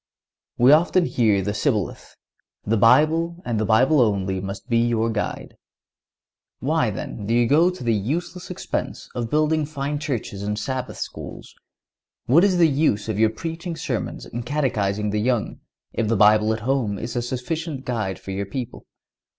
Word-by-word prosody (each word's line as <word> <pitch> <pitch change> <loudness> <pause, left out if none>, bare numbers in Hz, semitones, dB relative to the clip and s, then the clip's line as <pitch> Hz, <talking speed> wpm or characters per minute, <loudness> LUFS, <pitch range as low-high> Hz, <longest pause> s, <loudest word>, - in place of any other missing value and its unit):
We 125 +3 +6
often 170 +3 +4
hear 105 - +2
the 105 - -2
shibboleth: 105 - -2 0.5
"The 110 - +1
Bible, 160 - +4
and 115 -3 -1
the 110 - 0
Bible 130 +6 +4
only, 95 -4 0
must 95 +3 -6
be 115 -2 +2
your 115 -1 +1
guide." 105 -2 -4 1.0
Why, - - +1
then, 100 - -6
do 115 - +1
you 120 0 +4
go 155 +8 +4
to 180 -7 -7
the 115 -1 +2
useless 170 - -3
expense 180 - -4
of 120 -2 -3
building 155 +2 +2
fine 145 0 -3
churches 125 -9 -4
and 105 +1 -2
Sabbath 130 +4 -4
schools? - - -7 0.7
What 150 +9 +5
is 195 -3 +3
the 170 -2 +6
use 135 -8 +1
of 105 -1 -2
your 110 0 +5
preaching 165 +6 -5
sermons - - -4
and 120 +1 -6
catechizing 105 -7 -1
the 105 0 0
young, 120 -2 -1 0.3
if 115 -1 -1
the 115 0 +1
Bible 105 +1 +5
at 110 0 -2
home 120 -4 0
is 115 +4 -5
a 120 - 0
sufficient 135 +4 -4
guide 110 -6 -2
for 95 - -8
your 100 +1 -3
people? 125 +3 -6
120 Hz, 170 wpm, -23 LUFS, 105-150 Hz, 1.0 s, We